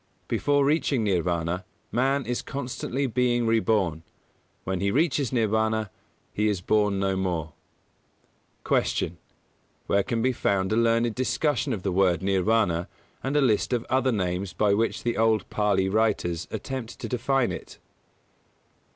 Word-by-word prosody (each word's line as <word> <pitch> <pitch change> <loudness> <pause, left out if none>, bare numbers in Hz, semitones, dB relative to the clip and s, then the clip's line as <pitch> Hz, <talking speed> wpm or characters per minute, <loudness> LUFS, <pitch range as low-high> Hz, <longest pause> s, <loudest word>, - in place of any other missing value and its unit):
Before 145 0 +2
reaching 140 -5 +1
Nirvāna 90 -2 0 0.3
man 135 +2 +1
is 120 +1 -2
constantly 135 0 -3
being 120 -1 +1
reborn; 110 -8 +1 0.6
when 95 -1 -2
he 100 +1 +1
reaches 140 +1 +1
Nirvāna 110 -2 +1 0.4
he 105 +1 +1
is 105 -3 0
born 105 +1 +1
no 95 0 0
more. 85 -5 -2 1.1
131. - - +3
Q. 85 - -2 0.7
_Where 100 0 +2
can 115 -3 0
be 130 - +3
found 95 -4 0
a - - +2
learned 115 0 +2
discussion 130 +2 0
of 100 -6 -3
the 95 - 0
word 90 -1 +2
Nirvāna 95 -2 +1 0.4
and 135 +3 0
a - - +4
list 125 -1 +2
of 120 -2 0
the - - -6
other 130 0 +3
names 90 -3 -2
by 105 +1 +2
which 115 +3 0
the 120 -1 -1
old 110 -3 +2
Pālī 95 -2 +1
writers 90 -7 0
attempt 130 -4 -5
to - - -5
define 130 +1 +1
it? - - -8
110 Hz, 150 wpm, -26 LUFS, 95-125 Hz, 1.1 s, a